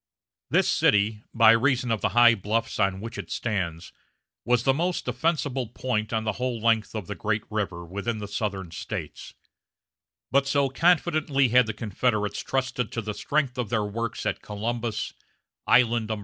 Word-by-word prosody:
This - - +3
city, 105 +1 +2
by 115 -1 +6
reason 125 +1 +2
of 110 - 0
the - - +1
high 120 -1 +8
bluffs 110 +3 -2
on 95 -2 +1
which 115 -1 -6
it 85 -4 -7
stands, 90 -8 -3 0.5
was 120 -1 +2
the 135 - +4
most 175 +5 -1
defensible 145 -6 -1
point 110 -2 -2
on 110 -1 0
the 110 - 0
whole 125 -2 -1
length 115 -1 +1
of 105 -4 -4
the 105 - -5
great 105 +1 -1
river 95 -5 -3
within 100 +6 -3
the 105 -1 -6
Southern 100 -4 -3
States; - - -7 1.0
but 140 +1 +3
so 140 -1 +2
confidently 155 -3 +2
had 125 0 +5
the 110 - -2
Confederates 105 -1 -1
trusted 130 -3 -2
to 115 - -2
the 105 0 -3
strength 135 +2 -1
of 120 -4 -2
their 110 -2 0
works 115 +3 -4
at - - -1
Columbus, 115 +2 -3 0.5
Island 120 -2 +4
No. 110 -1 -3
115 Hz, 170 wpm, -26 LUFS, 105-125 Hz, 1.0 s, high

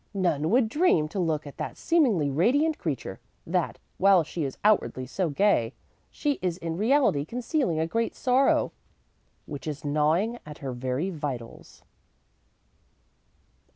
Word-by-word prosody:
None 165 -5 +1
would 240 +2 +4
dream, 245 - +2
to 190 - -4
look 160 -4 0
at 145 - -10
that - - -5
seemingly 230 - +2
radiant 285 - +2
creature, 130 - -4 0.3
that, - - -1 0.2
while 190 -2 +5
she 155 +1 -4
is 135 -2 -4
outwardly 205 -11 +2
so 175 +6 -2
gay, 145 - +2 0.3
she 290 -2 -2
is 180 -2 -1
in 165 -2 -4
reality 220 - +2
concealing 240 - -1
a 160 - +1
great 230 +8 -1
sorrow 260 +1 +2 0.7
which 145 0 -7
is 150 -1 -5
gnawing 160 +11 +1
at 150 -1 -10
her 135 -2 -5
very 130 +9 -2
vitals.'" 140 -8 -7
170 Hz, 140 wpm, -27 LUFS, 145-230 Hz, 0.7 s, while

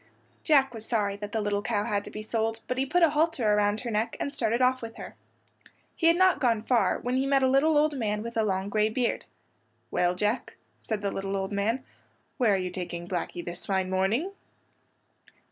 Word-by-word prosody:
Jack 275 -5 +4
was 225 -2 -7
sorry 210 -4 0
that 205 0 -7
the 220 - -1
little 205 0 0
cow 205 -1 -1
had 205 -1 -1
to - - -7
be 215 - -7
sold, 225 0 -1
but 255 +1 -2
he 270 - 0
put 355 +5 +2
a 325 - +5
halter 300 -6 +1
around 210 0 +2
her 240 - -4
neck 220 +2 -1
and 280 - -3
started 235 -3 0
off 255 0 +3
with 230 -1 -7
her. - - -9 0.8
He 330 - +2
had 335 - +6
not 370 -3 +4
gone 230 -6 +1
far, 240 0 +2
when 250 +2 -2
he 270 +1 +1
met 275 -1 +3
a - - +5
little 285 +4 +3
old 300 +1 +3
man 210 -4 -1
with 235 +1 -6
a 225 - +2
long 190 -2 -1
gray 215 +1 +1
beard. 240 +1 -1 0.7
"Well, 180 0 +1
Jack," 210 +6 -1 0.2
said 215 -2 -4
the 200 - 0
little 195 0 -3
old 195 +1 -3
man, 220 +6 -1 0.5
"where 220 -5 +3
are - - +1
you 185 -1 -3
taking 175 -1 -5
Blackey 175 -1 -3
this 175 +1 -7
fine 190 -1 0
morning?" 210 - +1
220 Hz, 215 wpm, -27 LUFS, 200-260 Hz, 0.8 s, had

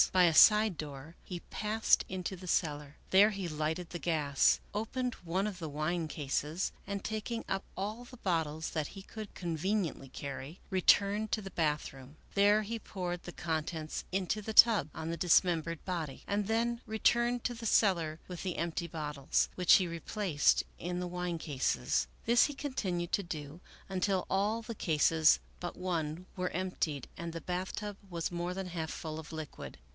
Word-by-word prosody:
By 185 -1 +5
a 170 -2 +5
side 210 +1 +7
door 145 +2 -7
he 175 -2 -6
passed 215 +1 +2
into 185 0 -3
the 185 0 -10
cellar. 150 -4 -1 0.2
There 200 +3 +7
he 195 -4 -4
lighted 160 +2 -2
the 175 - -4
gas, 150 -5 +3
opened 245 +4 -2
one 180 +4 0
of 200 -4 -4
the 160 -3 -4
wine 155 +3 -1
cases, 150 +4 -2 0.2
and, 200 -1 -3
taking 220 +2 -3
i:p 195 0 -1
all 215 +5 -3
the 250 +1 -13
bottles 160 -6 -1
that 155 -3 -1
he 195 - -10
could 215 0 -9
conveniently 170 -3 -1
carry, 140 +5 -7
returned 200 +3 +3
to 215 - +1
the 195 -1 -8
bathroom. 150 -3 -2 0.2
There 205 +2 +5
he 225 +2 -4
poured 180 -4 -4
the 175 - -7
contents 160 -1 -3
into 195 +2 0
the 220 +1 -5
tub 220 -10 +7
on 160 +1 -3
the 170 - -3
dismembered 170 -1 +2
body, 165 -7 -4
and 205 0 -1
then 235 +2 +1
returned 235 +2 +2
to 245 - -1
the 230 -1 -4
cellar 170 -8 +3
with 180 -2 -6
the 185 -3 -3
empty 170 0 -2
bottles, 150 -4 -1
which 180 -1 +6
he 185 - +4
replaced 170 -1 +1 0.2
in 175 +1 -3
the 180 - -2
wine 180 -1 -2
cases. 130 - 0 0.2
This 235 +1 +6
he 290 - -4
continued 190 - -2
to 200 - +2
do 155 -1 -7 0.3
until 190 0 0
all 210 +4 +1
the 230 0 -6
cases 160 -2 +4 0.2
but 175 - -5
one 170 -2 -2
were 180 -1 -1
emptied 175 -6 -2
and 170 0 -4
the 165 - -5
bath 180 +3 -3
tub 205 -1 -5
was 170 -1 -2
more 175 +1 -2
than 190 -1 -4
half 165 -2 -3
full 160 -2 -5
of 160 - -9
liquid. 155 -3 -7
180 Hz, 175 wpm, -32 LUFS, 160-200 Hz, 0.3 s, side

